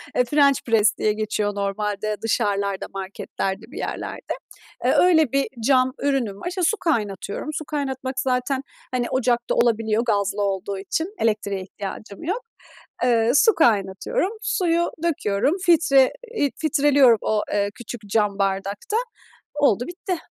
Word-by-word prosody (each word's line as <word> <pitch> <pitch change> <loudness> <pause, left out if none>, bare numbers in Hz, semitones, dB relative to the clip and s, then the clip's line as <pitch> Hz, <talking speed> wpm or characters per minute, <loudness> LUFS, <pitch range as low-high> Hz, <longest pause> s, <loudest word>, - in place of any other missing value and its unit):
Eee, 250 - +3
French 280 +1 +4
press 220 -2 +3
diye 210 - +1
geçiyor 210 -1 -2
normalde 205 +1 -2
dışarılarda, 200 -3 0
marketlerde, 195 0 -4
bir - - -9
yerlerde. - - -4 0.5
Eee, - - +4
öyle 320 -7 +4
bir 275 0 +2 0.2
cam 260 -1 +4
ürünüm 255 -8 -1
var. - - -3
İşte, 365 +1 -3
su 395 +6 +3
kaynatıyorum. 210 - -2
Su 310 - -4
kaynatmak 265 -3 -3
zaten, 260 +1 0 0.3
hani, 250 -1 0
ocakta 240 -2 +1
olabiliyor, 225 -1 +2
gazlı 205 -2 0
olduğu 195 0 -2
için 325 - -3
elektriğe 205 -3 0
ihtiyacım 200 +2 -8
yok. 390 +9 -2 0.6
Eee, 235 -2 +3
su 450 +8 +5
kaynatıyorum, 225 - +1
suyu 345 -5 +1
döküyorum, 285 - +1
filtre 295 -6 +5 0.2
eee, 285 -6 +2
filtreliyorum 285 -5 +4
o, 215 -1 0
eee, 200 0 +1
küçük 240 -1 -8
cam 205 -1 +1
bardakta. 195 - -1 0.6
Oldu, 275 -6 +2
bitti. 360 +1 -4
235 Hz, 135 wpm, -23 LUFS, 205-285 Hz, 0.6 s, su